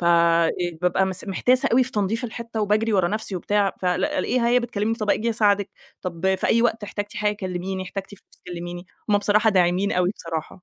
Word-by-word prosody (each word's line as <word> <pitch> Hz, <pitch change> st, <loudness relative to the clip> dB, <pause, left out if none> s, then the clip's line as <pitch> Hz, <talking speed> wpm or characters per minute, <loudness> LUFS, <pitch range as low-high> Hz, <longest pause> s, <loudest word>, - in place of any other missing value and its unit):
ف -, -, -3 dB
إ 170 Hz, 0 st, +2 dB
ببقى 190 Hz, +2 st, +1 dB
مس 185 Hz, -1 st, -4 dB
محتاسة 250 Hz, +6 st, +2 dB
أوي 255 Hz, +2 st, +5 dB
في 255 Hz, -, -5 dB
تنضيف 215 Hz, +3 st, -1 dB
الحِتّة 230 Hz, -1 st, -5 dB
وباجرِي 215 Hz, +2 st, +1 dB
ورا 185 Hz, -4 st, +3 dB
نفْسي 215 Hz, -1 st, -3 dB
وبتاع، 200 Hz, +2 st, +1 dB
فالاقيها 185 Hz, +6 st, 0 dB
هي 245 Hz, +1 st, +4 dB
بتكلّمني 225 Hz, -2 st, -1 dB
"طَب 215 Hz, -2 st, -2 dB
آجي 230 Hz, +3 st, +1 dB
أساعدِك 205 Hz, -3 st, +2 dB, 0.3 s
طَب 180 Hz, +1 st, 0 dB
في 190 Hz, -, -1 dB
أي 230 Hz, -, +3 dB
وقت 225 Hz, -2 st, +1 dB
احتاجتي 205 Hz, 0 st, -5 dB
حاجة 210 Hz, 0 st, +1 dB
كلّميني، 185 Hz, -1 st, -4 dB
احتاجتي 195 Hz, +2 st, -7 dB
فلوس -, -, -23 dB
كلّميني." 175 Hz, 0 st, -7 dB, 0.2 s
هُم 205 Hz, -, +5 dB
بصراحة 210 Hz, +2 st, +3 dB
داعمين 185 Hz, +1 st, +2 dB
أوي 180 Hz, 0 st, +2 dB
بصراحة. 165 Hz, +1 st, -6 dB
200 Hz, 190 wpm, -23 LUFS, 180-220 Hz, 0.3 s, أوي